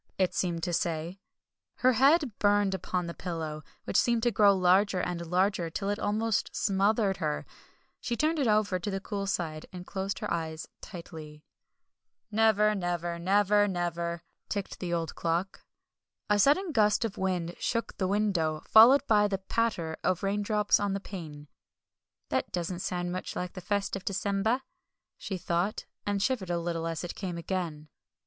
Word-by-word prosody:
it 185 Hz, -2 st, +1 dB
seemed 170 Hz, -3 st, -1 dB
to 175 Hz, -, -1 dB
say. 170 Hz, +2 st, -2 dB, 0.6 s
Her 255 Hz, 0 st, +3 dB
head 280 Hz, +3 st, +4 dB
burned 205 Hz, -1 st, +3 dB
upon 180 Hz, -1 st, -2 dB
the 170 Hz, -, -5 dB
pillow, 160 Hz, -4 st, -5 dB, 0.2 s
which -, -, -5 dB
seemed 235 Hz, -2 st, +1 dB
to 240 Hz, -, +3 dB
grow 200 Hz, -1 st, +5 dB
larger 185 Hz, +1 st, +3 dB
and 175 Hz, -1 st, -2 dB
larger, 180 Hz, 0 st, +1 dB
till 195 Hz, +4 st, -3 dB
it 205 Hz, -, -2 dB
almost 215 Hz, +1 st, 0 dB
smothered 200 Hz, 0 st, +2 dB
her. 75 Hz, 0 st, -2 dB, 0.5 s
She 240 Hz, -, -2 dB
turned 310 Hz, +3 st, +1 dB
it 270 Hz, -, +2 dB
over 210 Hz, -3 st, +2 dB
to 205 Hz, -, -4 dB
the 195 Hz, -1 st, -2 dB
cool 200 Hz, 0 st, -4 dB
side, 160 Hz, -5 st, -3 dB
and 180 Hz, -1 st, -8 dB
closed 195 Hz, +1 st, -3 dB
her -, -, -2 dB
eyes 160 Hz, -1 st, -4 dB
tightly. 160 Hz, -5 st, -10 dB, 0.9 s
"Never 215 Hz, -1 st, +4 dB
never! 175 Hz, -3 st, -2 dB
Never 205 Hz, +3 st, +3 dB
never!" 170 Hz, -2 st, -2 dB, 0.3 s
ticked 200 Hz, -2 st, -4 dB
the 175 Hz, -2 st, -4 dB
old 165 Hz, -2 st, -1 dB
clock. 170 Hz, +4 st, -2 dB, 0.7 s
A 205 Hz, -, +4 dB
sudden 310 Hz, -, +4 dB
gust 215 Hz, -3 st, +3 dB
of 210 Hz, -3 st, -5 dB
wind 180 Hz, -3 st, -1 dB
shook 230 Hz, -1 st, -2 dB
the 190 Hz, -, +1 dB
window, 185 Hz, -6 st, 0 dB
followed 245 Hz, +6 st, +7 dB
by 210 Hz, -3 st, +4 dB
the 195 Hz, -1 st, -1 dB
patter 190 Hz, -5 st, -1 dB
of 185 Hz, 0 st, 0 dB
raindrops 205 Hz, +1 st, +2 dB
on 205 Hz, -1 st, 0 dB
the 195 Hz, -, -1 dB
pane. 155 Hz, -7 st, -8 dB, 0.8 s
"That -, -, -1 dB
doesn't 175 Hz, 0 st, -3 dB
sound 175 Hz, -1 st, -2 dB
much 185 Hz, +1 st, -5 dB
like 180 Hz, 0 st, -4 dB
the 185 Hz, -, -7 dB
first 200 Hz, +1 st, -1 dB
of 195 Hz, -, -6 dB
December," 200 Hz, +6 st, 0 dB, 0.5 s
she 190 Hz, -, -5 dB
thought, 175 Hz, +4 st, -1 dB, 0.2 s
and 200 Hz, -1 st, 0 dB
shivered 225 Hz, -8 st, -1 dB
a 175 Hz, -, 0 dB
little 165 Hz, -1 st, -2 dB
as 165 Hz, 0 st, -3 dB
it 175 Hz, -, -4 dB
came 180 Hz, -4 st, -5 dB
again. 170 Hz, -4 st, -4 dB
190 Hz, 170 wpm, -29 LUFS, 170-210 Hz, 0.9 s, followed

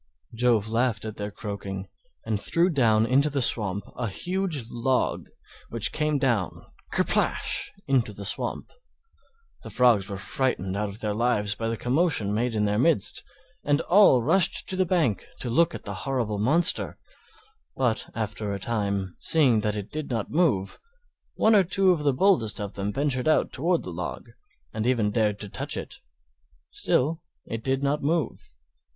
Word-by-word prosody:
Jove 115 Hz, -3 st, +1 dB
laughed 115 Hz, 0 st, 0 dB
at 110 Hz, -1 st, -6 dB
their 105 Hz, 0 st, -4 dB
croaking, 100 Hz, -2 st, -6 dB, 0.4 s
and 105 Hz, -2 st, -2 dB
threw 175 Hz, +2 st, +1 dB
down 115 Hz, -7 st, +3 dB
into 140 Hz, +5 st, +2 dB
the 140 Hz, -1 st, -2 dB
swamp 105 Hz, -5 st, +2 dB
a 120 Hz, -1 st, -3 dB
huge 175 Hz, -, -3 dB
Log, 125 Hz, +2 st, -1 dB, 0.4 s
which 115 Hz, -2 st, +2 dB
came 150 Hz, -1 st, 0 dB
down—kerplash—into 130 Hz, -, -1 dB
the 100 Hz, 0 st, -9 dB
swamp. -, -, -3 dB, 0.9 s
The -, -, -9 dB
Frogs 120 Hz, -6 st, +3 dB
were 100 Hz, -, -5 dB
frightened 95 Hz, -3 st, -2 dB
out 105 Hz, 0 st, -2 dB
of 100 Hz, +3 st, -9 dB
their 105 Hz, -1 st, -1 dB
lives 105 Hz, -2 st, +1 dB
by 115 Hz, +2 st, -4 dB
the 115 Hz, 0 st, -2 dB
commotion 125 Hz, -, +1 dB
made 115 Hz, +2 st, -1 dB
in 105 Hz, -1 st, +1 dB
their 105 Hz, +1 st, 0 dB
midst, 155 Hz, -, +2 dB, 0.4 s
and 145 Hz, 0 st, +2 dB
all 180 Hz, -, +5 dB
rushed 170 Hz, +7 st, +4 dB
to 190 Hz, -, +1 dB
the 185 Hz, -1 st, +1 dB
bank 155 Hz, -, 0 dB
to 120 Hz, -, -3 dB
look 170 Hz, +7 st, +2 dB
at -, -, -9 dB
the -, -, -5 dB
horrible 120 Hz, -7 st, -2 dB
monster; 155 Hz, -, +3 dB, 0.8 s
but 125 Hz, -4 st, -1 dB
after 110 Hz, -1 st, -3 dB
a -, -, -6 dB
time, 100 Hz, -4 st, -2 dB
seeing 135 Hz, -9 st, +3 dB
that 105 Hz, 0 st, -1 dB
it 105 Hz, -1 st, -6 dB
did 155 Hz, -1 st, -5 dB
not 115 Hz, -5 st, -3 dB
move, 140 Hz, -, 0 dB, 0.6 s
one 220 Hz, -, +3 dB
or 200 Hz, -2 st, +6 dB
two 185 Hz, +1 st, +2 dB
of 170 Hz, -4 st, 0 dB
the 145 Hz, -1 st, +2 dB
boldest 130 Hz, -, +2 dB
of 100 Hz, -1 st, -5 dB
them 100 Hz, +1 st, -3 dB
ventured 135 Hz, +1 st, -1 dB
out 155 Hz, -, +2 dB
toward 170 Hz, +5 st, 0 dB
the 90 Hz, -, -7 dB
Log, 85 Hz, +1 st, -6 dB, 0.4 s
and 110 Hz, +2 st, -2 dB
even 115 Hz, -5 st, +1 dB
dared 105 Hz, -2 st, 0 dB
to 105 Hz, -, -3 dB
touch -, -, -4 dB
it; -, -, -6 dB, 0.7 s
still 155 Hz, +6 st, 0 dB, 0.2 s
it 115 Hz, 0 st, -6 dB
did 135 Hz, +1 st, -1 dB
not 140 Hz, +2 st, 0 dB
move. 155 Hz, -, -2 dB
120 Hz, 165 wpm, -25 LUFS, 105-150 Hz, 0.9 s, or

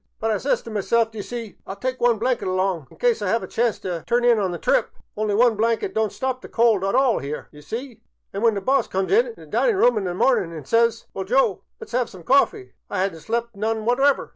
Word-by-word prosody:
But 225 Hz, 0 st, 0 dB
I 210 Hz, -, 0 dB
says 280 Hz, -, 0 dB
t' 230 Hz, -, -9 dB
myself, 225 Hz, +2 st, +1 dB
d 220 Hz, -, -8 dB
'ye -, -, -1 dB
see, 230 Hz, 0 st, -7 dB
I -, -, -4 dB
'11 200 Hz, -, -16 dB
tyke 255 Hz, 0 st, -2 dB
one 240 Hz, -1 st, +4 dB
blanket 240 Hz, -1 st, -1 dB
along 185 Hz, -5 st, -1 dB
in -, -, -18 dB
cyse 485 Hz, -2 st, +1 dB
I -, -, 0 dB
'ave 230 Hz, -, -2 dB
a -, -, -12 dB
chance 235 Hz, -2 st, 0 dB
t' 175 Hz, -2 st, -4 dB
turn 240 Hz, +1 st, +2 dB
in 235 Hz, -2 st, +5 dB
on 195 Hz, -2 st, 0 dB
the 175 Hz, -, -4 dB
trip. -, -, +1 dB, 0.3 s
Only 210 Hz, -1 st, 0 dB
one 235 Hz, +1 st, +4 dB
blanket 225 Hz, +1 st, 0 dB
don't 220 Hz, -1 st, 0 dB
stop 260 Hz, -1 st, -3 dB
the -, -, -11 dB
cold 225 Hz, -5 st, +3 dB
at 195 Hz, +4 st, 0 dB
all 260 Hz, -3 st, +3 dB
'ere, 145 Hz, +2 st, -6 dB
d' 150 Hz, -, -16 dB
ye -, -, -12 dB
see, 230 Hz, -, -7 dB, 0.3 s
an' 200 Hz, -, -3 dB
when 225 Hz, -2 st, +3 dB
the 200 Hz, -, -2 dB
boss 265 Hz, +4 st, +2 dB
comes 190 Hz, 0 st, -2 dB
int' 470 Hz, +2 st, +3 dB
the -, -, -14 dB
dinin' 480 Hz, -4 st, +1 dB
room 245 Hz, -, +3 dB
this 180 Hz, -2 st, -3 dB
mornin' 205 Hz, -6 st, +2 dB
an' 155 Hz, -4 st, -8 dB
says, 230 Hz, -, +2 dB
* -, -, -43 dB
Well, 190 Hz, -, -4 dB
Joe, 260 Hz, +7 st, +2 dB, 0.2 s
let 450 Hz, -, -10 dB
's -, -, -15 dB
'ave 245 Hz, -1 st, +1 dB
some 185 Hz, -3 st, -12 dB
coffee,' 280 Hz, -, +2 dB, 0.2 s
I 200 Hz, -, -2 dB
'ad 195 Hz, -2 st, -1 dB
n't 165 Hz, -, -11 dB
slept 235 Hz, +2 st, -3 dB
none 220 Hz, +1 st, -2 dB
whatever. 270 Hz, +4 st, +2 dB
225 Hz, 275 wpm, -23 LUFS, 200-250 Hz, 0.3 s, in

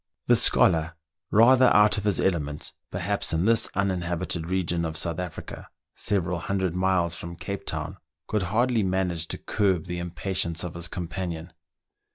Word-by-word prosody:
The -, -, +5 dB
scholar, 80 Hz, 0 st, +4 dB, 0.3 s
rather 125 Hz, +4 st, +6 dB
out 105 Hz, 0 st, +5 dB
of 105 Hz, -, -8 dB
his 105 Hz, -3 st, +1 dB
element, 75 Hz, -6 st, -1 dB, 0.2 s
perhaps, -, -, -2 dB
in 80 Hz, +3 st, +1 dB
this 115 Hz, 0 st, +3 dB
uninhabited 90 Hz, -3 st, -1 dB
region 85 Hz, -2 st, -1 dB
of 80 Hz, -1 st, -3 dB
South 85 Hz, 0 st, 0 dB
Africa, 90 Hz, -3 st, -7 dB, 0.3 s
several 90 Hz, -3 st, -1 dB
hundred 95 Hz, -1 st, -2 dB
miles 90 Hz, -2 st, +1 dB
from 85 Hz, 0 st, -7 dB
Cape 100 Hz, +3 st, -6 dB
Town, -, -, -4 dB, 0.3 s
could 105 Hz, -, -1 dB
hardly 120 Hz, +2 st, +2 dB
manage 90 Hz, -4 st, -1 dB
to -, -, -4 dB
curb 95 Hz, -6 st, 0 dB
the 90 Hz, -1 st, -4 dB
im 90 Hz, 0 st, -4 dB
patience 85 Hz, -2 st, -3 dB
of 90 Hz, -1 st, -5 dB
his 85 Hz, -1 st, -2 dB
companion. 85 Hz, -1 st, -5 dB
90 Hz, 160 wpm, -26 LUFS, 85-100 Hz, 0.3 s, rather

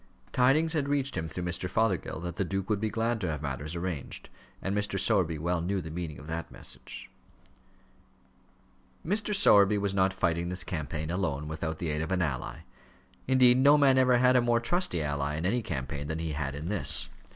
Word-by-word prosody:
Tidings 150 Hz, +6 st, +3 dB
had 145 Hz, -3 st, -1 dB
reached 140 Hz, -1 st, 0 dB
him, 80 Hz, -, -2 dB
through 85 Hz, +3 st, -5 dB
Mr. 90 Hz, +1 st, -1 dB
Fothergill, 100 Hz, -7 st, 0 dB
that 85 Hz, 0 st, -6 dB
the -, -, +1 dB
duke 95 Hz, +2 st, -3 dB
would 105 Hz, -, +1 dB
be 110 Hz, +1 st, -1 dB
glad 115 Hz, +1 st, -1 dB
to 90 Hz, -, -1 dB
have 75 Hz, -1 st, -4 dB
matters 75 Hz, +3 st, -4 dB
arranged; 85 Hz, -5 st, -5 dB, 0.3 s
and 95 Hz, +1 st, -2 dB
Mr. 100 Hz, -1 st, 0 dB
Sowerby 95 Hz, -5 st, +2 dB
well 85 Hz, +2 st, -1 dB
knew 95 Hz, +3 st, -1 dB
the 80 Hz, -3 st, -7 dB
meaning 80 Hz, -2 st, -5 dB
of 70 Hz, -, -11 dB
that 80 Hz, +1 st, -5 dB
message. -, -, -8 dB, 2.0 s
Mr. 210 Hz, +4 st, +1 dB
Sowerby 105 Hz, -, +6 dB
was 100 Hz, -1 st, -1 dB
not 95 Hz, 0 st, +2 dB
fighting 85 Hz, -2 st, -1 dB
this 90 Hz, 0 st, -1 dB
campaign 80 Hz, -2 st, -4 dB
alone, 80 Hz, -6 st, -2 dB
without 80 Hz, +1 st, -4 dB
the 85 Hz, -, -3 dB
aid 75 Hz, 0 st, -1 dB
of 80 Hz, -, -4 dB
any 90 Hz, -1 st, +1 dB
ally. 65 Hz, -5 st, -5 dB, 0.7 s
Indeed, 130 Hz, -1 st, +5 dB
no 140 Hz, +3 st, +6 dB
man 135 Hz, -2 st, +5 dB
ever 125 Hz, -1 st, +4 dB
had 125 Hz, +1 st, +4 dB
a 125 Hz, -, +5 dB
more 120 Hz, -1 st, +2 dB
trusty 120 Hz, -, 0 dB
ally 75 Hz, 0 st, -2 dB
in 80 Hz, +3 st, -3 dB
any 120 Hz, +6 st, +1 dB
campaign 70 Hz, -, -4 dB
than 80 Hz, +1 st, -3 dB
he 80 Hz, -1 st, -3 dB
had 70 Hz, -2 st, -3 dB
in 75 Hz, +4 st, -5 dB
this. 90 Hz, -10 st, +3 dB
90 Hz, 200 wpm, -29 LUFS, 80-115 Hz, 2.0 s, Sowerby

